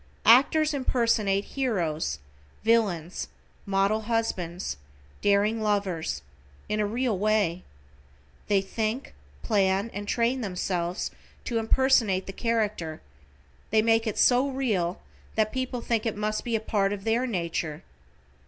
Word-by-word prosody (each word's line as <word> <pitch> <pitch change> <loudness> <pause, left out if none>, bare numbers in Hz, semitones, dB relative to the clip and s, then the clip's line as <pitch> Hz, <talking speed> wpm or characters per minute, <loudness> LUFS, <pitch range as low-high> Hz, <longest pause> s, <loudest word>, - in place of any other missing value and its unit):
Actors 295 +7 +6
impersonate 230 -7 +1
heroes, 175 - -1 0.5
villains, 200 -7 +1 0.4
model 195 +2 +2
husbands, 190 - -2 0.4
daring 205 +2 +2
lovers, 195 - -1 0.4
in 210 - -1
a 210 - +1
real 235 +1 0
way. 205 -4 +1 0.8
They 200 -2 +3
think, 220 +5 -3 0.3
plan, 195 +1 +1
and 205 +1 -5
train 240 +4 +1
themselves 180 -3 -2 0.3
to 230 -2 0
impersonate 225 -5 +3
the 195 - -7
character, 210 -9 -1 0.7
they 215 0 +3
make 225 0 +3
it 215 - -2
so 255 +3 +4
real 210 -10 -1 0.4
that 215 -1 +1
people 255 -2 -2
think 230 -1 0
it 220 - -2
must 215 +1 -1
be 235 -1 -1
a - - +2
part 200 -2 0
of 200 -1 -6
their 230 +4 +1
nature. 170 -7 -3
215 Hz, 125 wpm, -27 LUFS, 195-230 Hz, 0.8 s, Actors